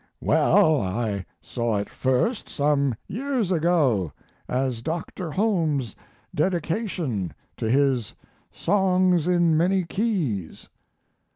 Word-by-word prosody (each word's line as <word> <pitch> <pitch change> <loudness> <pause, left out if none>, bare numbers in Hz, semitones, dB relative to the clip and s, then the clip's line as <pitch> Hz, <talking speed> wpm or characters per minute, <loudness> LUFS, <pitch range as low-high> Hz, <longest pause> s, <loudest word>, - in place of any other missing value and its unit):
"Well, 155 -3 +4
I 100 -1 -2 0.2
saw 115 -3 -1
it 100 - -2
first, 130 - 0
some 140 -3 +1
years 245 -3 -2
ago, 150 - +2 0.4
as 125 -2 -1
Dr. 165 +3 -4
Holmes's 155 - 0 0.4
dedication 165 - -1 0.2
to 110 - -2
his 130 -3 +1 0.4
Songs 185 -3 +2
in 175 -2 +3
Many 185 +4 +2
Keys." 165 - -2
155 Hz, 95 wpm, -24 LUFS, 120-180 Hz, 0.4 s, Well